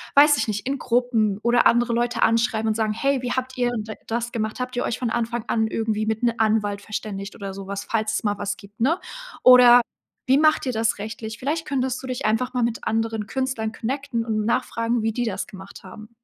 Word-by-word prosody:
weiß 290 Hz, +1 st, +7 dB
ich 225 Hz, -, -1 dB
nicht, 210 Hz, -1 st, -3 dB
in 275 Hz, 0 st, -1 dB
Gruppen 235 Hz, -5 st, +1 dB
oder 240 Hz, 0 st, +4 dB
andere 240 Hz, 0 st, +2 dB
Leute 240 Hz, +1 st, 0 dB
anschreiben 225 Hz, -1 st, +2 dB
und 215 Hz, -, 0 dB
sagen: 215 Hz, -1 st, 0 dB
„Hey, 275 Hz, +3 st, 0 dB
wie 250 Hz, -1 st, -2 dB
habt 260 Hz, 0 st, -3 dB
ihr 245 Hz, -1 st, +1 dB
d 215 Hz, 0 st, -5 dB
das 235 Hz, +1 st, -2 dB
gemacht? 220 Hz, -1 st, -3 dB
Habt 250 Hz, 0 st, -4 dB
ihr 245 Hz, -, 0 dB
euch -, -, -2 dB
von 240 Hz, -3 st, -1 dB
Anfang 235 Hz, 0 st, -2 dB
an 220 Hz, -1 st, +1 dB
irgendwie 220 Hz, -1 st, -1 dB
mit 220 Hz, +1 st, -2 dB
'n 235 Hz, -1 st, +3 dB
Anwalt 210 Hz, -2 st, +1 dB
verständigt 200 Hz, -1 st, -6 dB
oder 195 Hz, -2 st, -6 dB
so 195 Hz, 0 st, -8 dB
was“, 200 Hz, 0 st, -4 dB
falls 220 Hz, -1 st, -1 dB
es -, -, -1 dB
mal 205 Hz, -1 st, 0 dB
was 200 Hz, 0 st, -3 dB
gibt, 200 Hz, +1 st, -16 dB
ne? 300 Hz, +10 st, +2 dB, 0.4 s
Oder: 245 Hz, -1 st, +9 dB, 0.5 s
„Wie 265 Hz, +1 st, +5 dB
macht 310 Hz, -1 st, +3 dB
ihr -, -, +1 dB
das 225 Hz, 0 st, 0 dB
rechtlich?“ 220 Hz, +1 st, -6 dB
Vielleicht 310 Hz, +5 st, -2 dB
könntest 260 Hz, -2 st, -1 dB
du -, -, -6 dB
dich 255 Hz, +1 st, -4 dB
einfach 225 Hz, +4 st, 0 dB
mal 250 Hz, -, 0 dB
mit 235 Hz, 0 st, -2 dB
anderen 225 Hz, -1 st, -1 dB
Künstlern 260 Hz, -4 st, -2 dB
connecten 250 Hz, +1 st, -3 dB
und 215 Hz, -2 st, -1 dB
nachfragen, 230 Hz, +1 st, 0 dB
wie 225 Hz, -, +1 dB
die 245 Hz, +2 st, -1 dB
das 195 Hz, -4 st, -3 dB
gemacht 190 Hz, 0 st, -12 dB
haben. 215 Hz, +3 st, -11 dB
230 Hz, 225 wpm, -23 LUFS, 215-250 Hz, 0.5 s, Oder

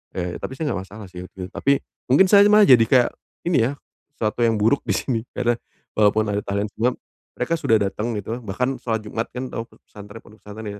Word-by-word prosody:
ya 90 Hz, -1 st, -3 dB
tapi -, -, -5 dB
saya 145 Hz, 0 st, -2 dB
enggak 95 Hz, -, -2 dB
masalah 105 Hz, +1 st, -10 dB
sih 90 Hz, 0 st, -8 dB
itu, 90 Hz, -1 st, -8 dB
tapi 140 Hz, 0 st, +1 dB, 0.3 s
mungkin 145 Hz, +9 st, +5 dB
saya 200 Hz, 0 st, +8 dB
malah 210 Hz, 0 st, +6 dB
jadi 120 Hz, -3 st, +7 dB
kayak 125 Hz, 0 st, +4 dB, 0.4 s
ini 135 Hz, -10 st, +3 dB
ya, -, -, -2 dB, 0.4 s
suatu 110 Hz, +2 st, -1 dB
yang 115 Hz, -, +2 dB
buruk 110 Hz, +6 st, +2 dB
di -, -, +1 dB
sini. 120 Hz, -4 st, -1 dB, 0.2 s
Karena 120 Hz, -1 st, 0 dB, 0.3 s
walaupun 105 Hz, 0 st, +3 dB
ada 100 Hz, -, 0 dB
tahlilan, 100 Hz, +1 st, -2 dB
cuma 125 Hz, +3 st, +2 dB, 0.4 s
mereka 125 Hz, +7 st, -1 dB
sudah 115 Hz, -, +3 dB
datang 105 Hz, +3 st, -2 dB
gitu 110 Hz, +4 st, -4 dB
bahkan 125 Hz, +7 st, -1 dB
sholat 110 Hz, -2 st, -2 dB
Jumat 115 Hz, +1 st, -2 dB
kan 130 Hz, +1 st, -5 dB
tau 115 Hz, -, -4 dB
p -, -, -22 dB
pesantren 105 Hz, +2 st, -12 dB
pondok 105 Hz, 0 st, -18 dB
pesantren 105 Hz, 0 st, -8 dB
115 Hz, 210 wpm, -22 LUFS, 105-125 Hz, 0.4 s, saya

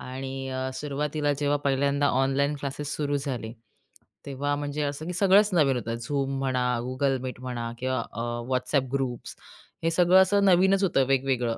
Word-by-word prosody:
आणि 135 Hz, +1 st, -6 dB
अ, 130 Hz, 0 st, -3 dB
सुरवातीला 150 Hz, +1 st, -1 dB
जेव्हा 145 Hz, 0 st, +2 dB
पहिल्यांदा 140 Hz, +1 st, +2 dB, 0.2 s
ऑनलाईन 140 Hz, +2 st, +1 dB
क्लासेस 145 Hz, +1 st, -4 dB
सुरू 145 Hz, -1 st, -1 dB
झाले 125 Hz, -6 st, -4 dB, 0.7 s
तेव्हा 145 Hz, +1 st, -2 dB
म्हणजे 145 Hz, +1 st, -3 dB
असं 145 Hz, +2 st, -4 dB
की 180 Hz, -, -3 dB
सगळंच 200 Hz, +3 st, +4 dB
नवीन 145 Hz, -6 st, +3 dB
होतं. 115 Hz, -1 st, -4 dB
Zoom 140 Hz, -2 st, -1 dB
म्हणा 130 Hz, -2 st, 0 dB, 0.2 s
Google 135 Hz, +1 st, 0 dB
Meet 125 Hz, -, -6 dB
म्हणा 120 Hz, -2 st, -4 dB
किंवा 130 Hz, 0 st, -1 dB
अ, 115 Hz, -, -5 dB, 0.3 s
WhatsApp 130 Hz, +1 st, 0 dB
ग्रुप्स 130 Hz, -3 st, -3 dB, 0.5 s
हे 165 Hz, -, +2 dB
सगळं 180 Hz, +2 st, +5 dB
असं 200 Hz, +2 st, +3 dB
नवीनच 190 Hz, +1 st, +4 dB
होतं 135 Hz, -8 st, +2 dB
वेगवेगळं. 130 Hz, -3 st, 0 dB
140 Hz, 160 wpm, -26 LUFS, 130-150 Hz, 0.7 s, सगळं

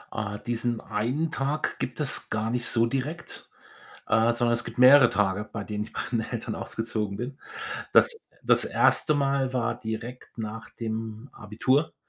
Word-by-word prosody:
Ah, 105 Hz, -2 st, -3 dB
diesen 120 Hz, +1 st, -2 dB
einen 125 Hz, +10 st, -1 dB
Tag 140 Hz, +2 st, -1 dB
gibt 125 Hz, -, -4 dB
es 150 Hz, -3 st, -1 dB
gar 110 Hz, +1 st, -1 dB
nicht 120 Hz, 0 st, -1 dB
so 115 Hz, 0 st, +3 dB
direkt, 135 Hz, +8 st, -4 dB, 0.6 s
äh, 115 Hz, +1 st, +4 dB
sondern 120 Hz, 0 st, +2 dB
es 120 Hz, -, +1 dB
gibt -, -, -9 dB
mehrere 130 Hz, +2 st, +8 dB
Tage, 105 Hz, +1 st, 0 dB
bei 105 Hz, -, -4 dB
denen 105 Hz, 0 st, -3 dB
ich -, -, -16 dB
bei -, -, -2 dB
meinen 115 Hz, -2 st, -1 dB
Eltern -, -, -3 dB
ausgezogen 110 Hz, -3 st, -3 dB
bin. 130 Hz, +4 st, -5 dB, 0.5 s
Das -, -, +7 dB, 0.3 s
das -, -, +4 dB
1. 155 Hz, -, +3 dB
Mal 135 Hz, -2 st, +1 dB
war 120 Hz, -2 st, -1 dB
direkt 115 Hz, +3 st, -6 dB
nach 110 Hz, +1 st, -6 dB
dem 110 Hz, +2 st, -5 dB
Abitur, 125 Hz, +8 st, 0 dB
120 Hz, 165 wpm, -27 LUFS, 110-130 Hz, 0.6 s, mehrere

